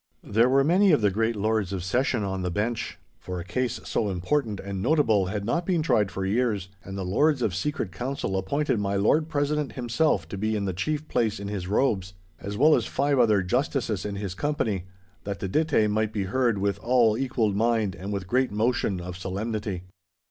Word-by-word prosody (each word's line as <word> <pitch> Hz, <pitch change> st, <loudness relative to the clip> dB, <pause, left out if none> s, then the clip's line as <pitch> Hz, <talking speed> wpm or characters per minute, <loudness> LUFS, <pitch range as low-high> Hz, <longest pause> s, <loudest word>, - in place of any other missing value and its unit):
There 115 Hz, +4 st, +3 dB
were 135 Hz, +1 st, +4 dB
many 185 Hz, +6 st, +4 dB
of 145 Hz, -, +3 dB
the 100 Hz, -1 st, +3 dB
great 115 Hz, +3 st, 0 dB
Lords 105 Hz, -2 st, 0 dB
of 95 Hz, -3 st, -3 dB
Session 120 Hz, +3 st, 0 dB
on 95 Hz, -1 st, -2 dB
the 90 Hz, -, -1 dB
bench. 110 Hz, +6 st, -2 dB, 0.2 s
For 90 Hz, 0 st, -5 dB
a -, -, -5 dB
case 120 Hz, +4 st, -2 dB
so 105 Hz, -, -1 dB
important 105 Hz, +4 st, -1 dB
and 95 Hz, -1 st, -5 dB
notable 115 Hz, -, +3 dB
had 100 Hz, +1 st, -3 dB
not 170 Hz, +10 st, 0 dB
been 175 Hz, -3 st, 0 dB
tried 105 Hz, -, +2 dB
for 95 Hz, 0 st, -4 dB
years, 105 Hz, -2 st, 0 dB
and 95 Hz, +1 st, -7 dB
the 95 Hz, -, -3 dB
Lords 135 Hz, +8 st, +2 dB
of 100 Hz, -, 0 dB
Secret 110 Hz, -, -2 dB
Council 125 Hz, -1 st, -3 dB
appointed 120 Hz, +6 st, 0 dB
my 100 Hz, -1 st, -1 dB
Lord 150 Hz, +11 st, +2 dB
President 145 Hz, -3 st, -1 dB
himself 120 Hz, -, 0 dB
to 100 Hz, -, -5 dB
be 110 Hz, +1 st, 0 dB
in 100 Hz, -1 st, -1 dB
the 95 Hz, -, -1 dB
chief 155 Hz, -, -2 dB
place 110 Hz, -6 st, 0 dB
in 100 Hz, 0 st, -5 dB
his 95 Hz, -3 st, -4 dB
robes, 95 Hz, -4 st, 0 dB, 0.2 s
as 100 Hz, +1 st, -5 dB
well 155 Hz, +4 st, +6 dB
as -, -, +2 dB
five 140 Hz, 0 st, +1 dB
other 105 Hz, -5 st, +4 dB
justices 115 Hz, -1 st, -1 dB
in 105 Hz, -1 st, -4 dB
his 100 Hz, -2 st, -4 dB
company, 110 Hz, -, -1 dB, 0.4 s
that 100 Hz, -3 st, -4 dB
the 95 Hz, -, -3 dB
dittay 150 Hz, -1 st, +2 dB
might 110 Hz, +1 st, 0 dB
be 105 Hz, -2 st, -2 dB
heard 115 Hz, +3 st, +1 dB
with 100 Hz, 0 st, -1 dB
all 120 Hz, -3 st, +3 dB
equal 120 Hz, -4 st, 0 dB
mind 110 Hz, -1 st, +1 dB
and 95 Hz, +2 st, -6 dB
with 100 Hz, -2 st, -3 dB
great 130 Hz, +4 st, +1 dB
motion 105 Hz, -3 st, 0 dB
of 90 Hz, 0 st, -6 dB
solemnity. 100 Hz, 0 st, -3 dB
110 Hz, 205 wpm, -26 LUFS, 95-130 Hz, 0.4 s, well